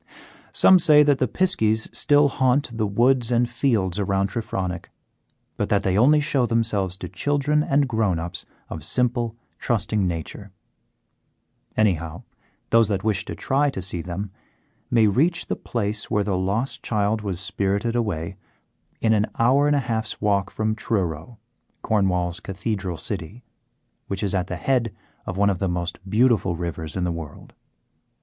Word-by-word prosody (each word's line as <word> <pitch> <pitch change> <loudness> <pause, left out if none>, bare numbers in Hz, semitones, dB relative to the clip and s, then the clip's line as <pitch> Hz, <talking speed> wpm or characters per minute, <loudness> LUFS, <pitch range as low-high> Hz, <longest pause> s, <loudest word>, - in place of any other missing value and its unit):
Some 190 -1 +6
say 150 -2 +6
that 145 -2 +2
the 130 - +2
piskies 110 - +1
still 145 0 +4
haunt 130 -2 +1
the 110 -2 0
woods 120 +3 +2
and 120 0 +3
fields 115 -7 0
around 100 0 0
Trefronick, 95 -6 -4 0.7
but - - -1
that 100 -1 +2
they 95 -1 +1
only 140 +8 +5
show 140 -4 +1
themselves 105 -6 0
to - - -6
children 145 +1 0
and 140 -1 +2
grown 110 -7 0
ups 85 +3 -5 0.2
of - - -7
simple, 120 -2 0 0.2
trusting 105 -3 0
nature. 85 +4 -5 1.3
Anyhow, 85 -7 0 0.5
those 115 -1 +5
that 95 -2 -1
wish 105 -4 0
to - - -6
try 145 +2 +1
to 135 - -5
see 90 -2 -3
them 95 +4 -5 0.6
may 115 -2 +4
reach 155 - +2
the - - -2
place 105 -2 -3
where 105 - +1
the 100 -2 -1
lost 100 +8 -1
child 105 0 0
was 95 -4 -4
spirited 100 +5 -1
away 95 -6 -2 0.6
in 110 -1 +3
an 105 -1 +2
hour 135 +5 +4
and 145 - +3
a - - +3
half's 115 -3 -3
walk 100 -2 +1
from 110 0 -1
Truro, 95 -2 -3 0.5
Cornwall's 90 -5 +1
cathedral 95 -2 -4
city, 100 +6 -5 0.6
which 100 +1 -3
is 100 - 0
at 90 -2 0
the 90 - -4
head 120 -1 0 0.3
of 95 - -4
one 100 0 +3
of 90 - -3
the 95 - 0
most 85 0 -3
beautiful 110 -5 +2
rivers 85 -1 -4
in 90 - -1
the 90 - 0
world. 80 -3 -8
105 Hz, 160 wpm, -23 LUFS, 95-120 Hz, 1.3 s, Some